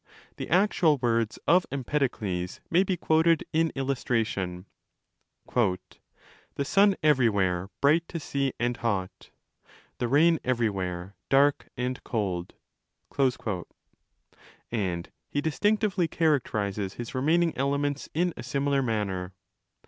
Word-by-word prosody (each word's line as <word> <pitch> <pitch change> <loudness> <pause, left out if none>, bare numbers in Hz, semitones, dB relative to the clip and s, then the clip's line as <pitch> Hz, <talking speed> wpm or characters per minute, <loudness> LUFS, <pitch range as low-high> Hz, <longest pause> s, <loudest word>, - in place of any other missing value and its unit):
The - - -5
actual 175 -4 +3
words 115 -3 0
of 175 +3 +4
Empedokles 120 -10 -2
may 175 +2 +5
be 190 -1 0
quoted 160 0 +3
in 160 0 +2
illustration— 115 -9 -1 0.9
The 105 -7 +2 0.9
sun 195 +5 +4
everywhere 100 - +2
bright 155 +4 +4
to 170 - -5
see, 140 -2 -1
and 120 0 0
hot; 100 -5 -3 0.7
The 120 - 0
rain 160 +5 +4
everywhere 100 -7 -1 0.2
dark 140 +1 +3
and 125 +1 -3
cold;? 95 -6 -3 2.2
and 95 -7 -2 0.2
he 145 - -1
distinctively 200 +4 +1
characterizes 105 - 0
his 120 -1 -6
remaining 160 +6 +2
elements 140 +1 -1
in 175 +1 +1
a - - -7
similar 140 +3 0
manner. 100 -6 -2
130 Hz, 105 wpm, -27 LUFS, 105-155 Hz, 2.2 s, may